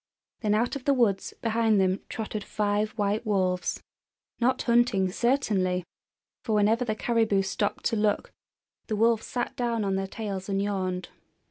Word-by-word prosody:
Then 210 Hz, -2 st, +1 dB
out 235 Hz, +5 st, +1 dB
of 275 Hz, -, -6 dB
the 280 Hz, -, +4 dB
woods 220 Hz, -6 st, +1 dB
behind 225 Hz, -2 st, +2 dB
them 190 Hz, +1 st, +2 dB
trotted 215 Hz, -1 st, -4 dB
five 210 Hz, 0 st, 0 dB
white 210 Hz, 0 st, 0 dB
wolves, 185 Hz, -4 st, 0 dB, 0.6 s
not 255 Hz, +2 st, +2 dB
hunting, 235 Hz, -6 st, +3 dB
certainly! 195 Hz, -7 st, +1 dB, 0.6 s
for 220 Hz, -3 st, 0 dB
whenever 215 Hz, +4 st, +3 dB
the 215 Hz, -3 st, -1 dB
caribou 220 Hz, -4 st, +2 dB
stopped 200 Hz, +1 st, -2 dB
to 230 Hz, -, +2 dB
look 210 Hz, -1 st, 0 dB, 0.6 s
the 215 Hz, -, -1 dB
wolves 225 Hz, +1 st, +2 dB
sat 245 Hz, -1 st, -3 dB
down 235 Hz, -3 st, -1 dB
on 195 Hz, -1 st, 0 dB
their 195 Hz, 0 st, -2 dB
tails 195 Hz, -2 st, -5 dB
and 195 Hz, 0 st, 0 dB
yawned. 185 Hz, -2 st, -2 dB
210 Hz, 155 wpm, -27 LUFS, 195-230 Hz, 0.6 s, the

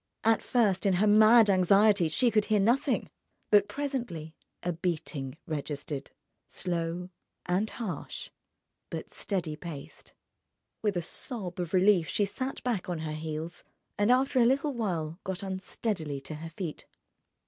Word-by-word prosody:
At 225 Hz, 0 st, +4 dB
first, 205 Hz, -6 st, +2 dB
in 195 Hz, -, +4 dB
her 185 Hz, +4 st, +3 dB
mad 215 Hz, +2 st, +7 dB
anxiety, 195 Hz, -1 st, +5 dB
she 235 Hz, +9 st, +2 dB
could 215 Hz, -2 st, +3 dB
hear 215 Hz, -1 st, +2 dB
nothing. 235 Hz, +7 st, +2 dB, 0.4 s
But 205 Hz, -1 st, +6 dB
presently 240 Hz, -, -4 dB, 0.3 s
a 175 Hz, -, 0 dB
beating 155 Hz, -5 st, -3 dB
registered, 145 Hz, -2 st, -4 dB, 0.4 s
slow 175 Hz, 0 st, -3 dB, 0.3 s
and 190 Hz, +5 st, +1 dB
harsh 220 Hz, -6 st, -5 dB, 0.6 s
but -, -, -6 dB
steady 175 Hz, -6 st, -2 dB
paced. 155 Hz, -3 st, -9 dB, 0.7 s
With 205 Hz, -4 st, 0 dB
a 175 Hz, -, -1 dB
sob 185 Hz, -1 st, -4 dB
of 175 Hz, -2 st, -3 dB
relief 185 Hz, -3 st, +4 dB
she 205 Hz, -, +1 dB
sat 260 Hz, +7 st, -4 dB
back 225 Hz, -8 st, -1 dB
on 175 Hz, -, -1 dB
her 155 Hz, -1 st, -3 dB
heels, 155 Hz, +2 st, -5 dB, 0.3 s
and 205 Hz, +2 st, +2 dB
after 260 Hz, +1 st, +4 dB
a -, -, +6 dB
little 275 Hz, +3 st, +2 dB
while 175 Hz, -8 st, -2 dB
got 190 Hz, +1 st, -4 dB
unsteadily 190 Hz, -5 st, -3 dB
to 155 Hz, -, -7 dB
her 160 Hz, +2 st, -7 dB
feet. 165 Hz, -2 st, -6 dB
185 Hz, 145 wpm, -29 LUFS, 165-215 Hz, 0.7 s, mad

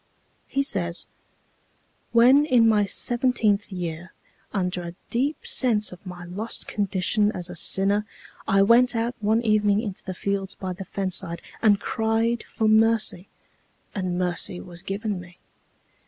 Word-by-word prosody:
He 275 Hz, -, 0 dB
says: 175 Hz, -9 st, -1 dB, 1.1 s
"When 250 Hz, +5 st, +6 dB
in 240 Hz, -5 st, +5 dB
my 210 Hz, -2 st, +3 dB
seventeenth 230 Hz, -2 st, +1 dB
year, 175 Hz, -1 st, -5 dB, 0.4 s
under 180 Hz, -2 st, -1 dB
a 170 Hz, 0 st, -7 dB, 0.2 s
deep 275 Hz, +6 st, -1 dB
sense 220 Hz, -5 st, +2 dB
of 180 Hz, -, -12 dB
my 175 Hz, -1 st, -8 dB
lost 200 Hz, +6 st, -4 dB
condition 205 Hz, +1 st, 0 dB
as 180 Hz, 0 st, -5 dB
a -, -, -8 dB
sinner, 200 Hz, +4 st, +2 dB, 0.4 s
I 195 Hz, -2 st, +4 dB
went 235 Hz, +4 st, +4 dB
out 230 Hz, +1 st, -1 dB
one 220 Hz, +2 st, +1 dB
evening 210 Hz, -2 st, +3 dB
into 205 Hz, -4 st, -5 dB
the 185 Hz, -, -6 dB
fields 195 Hz, 0 st, -3 dB
by 185 Hz, -1 st, -5 dB
the 190 Hz, +2 st, -8 dB
fence 190 Hz, -1 st, -2 dB
side, 170 Hz, -2 st, -3 dB, 0.2 s
and 210 Hz, -3 st, +4 dB
cried 225 Hz, +2 st, 0 dB
for 220 Hz, -, -1 dB
mercy, 220 Hz, -4 st, +3 dB, 0.7 s
and 185 Hz, -3 st, -2 dB
mercy 180 Hz, 0 st, -1 dB
was 175 Hz, -1 st, -7 dB
given 200 Hz, +1 st, -3 dB
me. 175 Hz, 0 st, -15 dB
205 Hz, 145 wpm, -24 LUFS, 185-225 Hz, 1.1 s, When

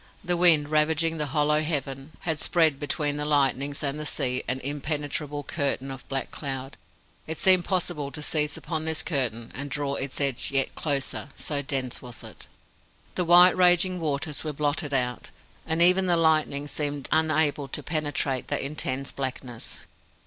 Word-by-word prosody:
The 175 Hz, -1 st, +1 dB
wind, 165 Hz, -4 st, +4 dB
ravaging 160 Hz, +1 st, +2 dB
the 150 Hz, -, -1 dB
hollow 150 Hz, +2 st, +2 dB
heaven, 140 Hz, -2 st, -3 dB
had 160 Hz, -5 st, -2 dB
spread 160 Hz, -5 st, +3 dB
between 145 Hz, 0 st, 0 dB
the 150 Hz, -, -2 dB
lightnings 140 Hz, -1 st, +1 dB
and 140 Hz, +1 st, -1 dB
the 150 Hz, -, -4 dB
sea 130 Hz, -4 st, +1 dB
an 130 Hz, +2 st, -1 dB
impenetrable 145 Hz, +1 st, -3 dB
curtain 135 Hz, -1 st, -2 dB
of 135 Hz, -1 st, -10 dB
black 135 Hz, -1 st, -3 dB
cloud. 135 Hz, -2 st, -5 dB, 0.5 s
It 160 Hz, 0 st, -4 dB
seemed 185 Hz, -2 st, +4 dB
possible 175 Hz, -6 st, -1 dB
to 150 Hz, 0 st, -5 dB
seize 150 Hz, -1 st, +1 dB
upon 160 Hz, -2 st, -3 dB
this 160 Hz, -1 st, 0 dB
curtain 120 Hz, -7 st, -1 dB
and 140 Hz, +2 st, -4 dB
draw 140 Hz, +1 st, -2 dB
its 135 Hz, -1 st, -3 dB
edge 140 Hz, -4 st, 0 dB
yet 135 Hz, -1 st, +1 dB
closer, 140 Hz, -2 st, -2 dB
so 145 Hz, -2 st, -2 dB
dense 135 Hz, -3 st, -3 dB
was 125 Hz, -2 st, -8 dB
it. -, -, -10 dB, 0.7 s
The 180 Hz, -, -1 dB
white 175 Hz, +2 st, +8 dB
and 185 Hz, -, -5 dB
raging 180 Hz, 0 st, +4 dB
waters 150 Hz, -1 st, -2 dB
were 155 Hz, -1 st, -3 dB
blotted 145 Hz, 0 st, -1 dB
out, 125 Hz, -2 st, -1 dB, 0.4 s
and 160 Hz, +1 st, +3 dB
even 185 Hz, +1 st, +4 dB
the 175 Hz, -1 st, +3 dB
lightning 155 Hz, -3 st, +2 dB
seemed 145 Hz, -2 st, -1 dB
unable 155 Hz, -2 st, +2 dB
to -, -, -5 dB
penetrate 145 Hz, -4 st, -1 dB
that -, -, 0 dB
intense 135 Hz, -1 st, -3 dB
blackness. 130 Hz, -3 st, -5 dB
145 Hz, 170 wpm, -26 LUFS, 135-160 Hz, 0.7 s, white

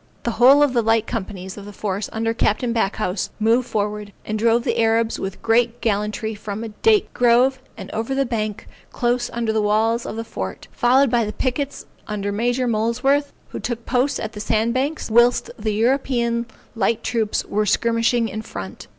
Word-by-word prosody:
The 235 Hz, -, 0 dB
whole 265 Hz, +6 st, +6 dB
of 285 Hz, -3 st, +2 dB
the 240 Hz, -, +3 dB
light 225 Hz, 0 st, +2 dB
companies 190 Hz, -5 st, -5 dB
of 200 Hz, -, -10 dB
the 205 Hz, -, -9 dB
force 200 Hz, 0 st, -3 dB
under 225 Hz, 0 st, -1 dB
Capt. 220 Hz, 0 st, +1 dB
Backhouse, 195 Hz, -3 st, -1 dB
moved 230 Hz, +3 st, +2 dB
forward, 210 Hz, -1 st, -3 dB
and 215 Hz, 0 st, -2 dB
drove 230 Hz, +1 st, +3 dB
the -, -, -1 dB
Arabs 225 Hz, 0 st, +2 dB
with 190 Hz, 0 st, -6 dB
great 235 Hz, +1 st, +2 dB
gallantry 215 Hz, +1 st, -1 dB
from 210 Hz, +1 st, -6 dB
a 225 Hz, -, -5 dB
date 420 Hz, -, +2 dB
grove, 250 Hz, +2 st, +3 dB, 0.2 s
and -, -, -8 dB
over 230 Hz, +5 st, -2 dB
the 275 Hz, 0 st, +1 dB
bank 215 Hz, -4 st, -3 dB, 0.2 s
close 240 Hz, 0 st, 0 dB
under 230 Hz, -2 st, -1 dB
the 220 Hz, -, +1 dB
walls 220 Hz, +3 st, +1 dB
of -, -, -5 dB
the 225 Hz, -, -3 dB
fort, 95 Hz, -, -6 dB
followed 255 Hz, +1 st, +3 dB
by 240 Hz, -2 st, +3 dB
the 210 Hz, -, -3 dB
pickets 265 Hz, +4 st, -3 dB, 0.2 s
under 205 Hz, -1 st, -3 dB
Major 245 Hz, +4 st, 0 dB
Molesworth, 250 Hz, +6 st, +1 dB, 0.2 s
who -, -, -6 dB
took 235 Hz, -1 st, -4 dB
post 260 Hz, +2 st, +1 dB
at 220 Hz, -, -4 dB
the 210 Hz, -, -9 dB
sand 220 Hz, +2 st, +1 dB
banks, 275 Hz, 0 st, -2 dB
whilst 240 Hz, +2 st, +4 dB
the 215 Hz, -1 st, -1 dB
European 235 Hz, 0 st, +1 dB, 0.3 s
light 225 Hz, +1 st, 0 dB
troops 220 Hz, -2 st, -1 dB
were 210 Hz, +1 st, -1 dB
skirmishing 230 Hz, +2 st, +2 dB
in 215 Hz, +1 st, -5 dB
front. 95 Hz, -, -8 dB
230 Hz, 185 wpm, -21 LUFS, 215-245 Hz, 0.3 s, whole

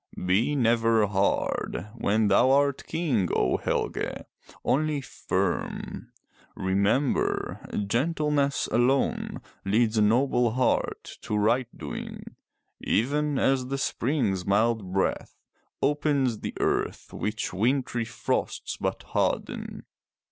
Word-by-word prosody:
Be 105 Hz, +11 st, +2 dB
never 115 Hz, -3 st, +3 dB
hard 100 Hz, -1 st, -1 dB
when 110 Hz, -2 st, +1 dB
thou 120 Hz, +6 st, +5 dB
art 140 Hz, 0 st, +2 dB
King, 140 Hz, -, 0 dB
O 65 Hz, -, +2 dB
Helge, -, -, -2 dB, 0.2 s
— -, -, -22 dB
only 155 Hz, +1 st, +1 dB
firm. 135 Hz, -, -3 dB, 0.4 s
Remember, 100 Hz, +8 st, 0 dB, 0.2 s
gentleness 145 Hz, +4 st, +1 dB
alone 125 Hz, +4 st, +1 dB, 0.2 s
leads 110 Hz, +2 st, +2 dB
a -, -, +4 dB
noble 120 Hz, +1 st, +3 dB
heart 130 Hz, +1 st, 0 dB, 0.2 s
to 105 Hz, -, -2 dB
right 115 Hz, +4 st, +2 dB
doing, -, -, -7 dB, 0.4 s
even 145 Hz, +5 st, +1 dB
as 135 Hz, -2 st, +2 dB
the 135 Hz, +1 st, -2 dB
Spring's 125 Hz, -8 st, 0 dB
mild 105 Hz, 0 st, +1 dB
breath 95 Hz, 0 st, -1 dB, 0.5 s
opens 140 Hz, -5 st, +1 dB
the -, -, -5 dB
earth -, -, -1 dB
which 105 Hz, -1 st, -3 dB
wintry 120 Hz, +3 st, 0 dB
frosts 115 Hz, -, -2 dB
but -, -, -3 dB
harden.. -, -, -2 dB
120 Hz, 105 wpm, -27 LUFS, 105-140 Hz, 0.5 s, thou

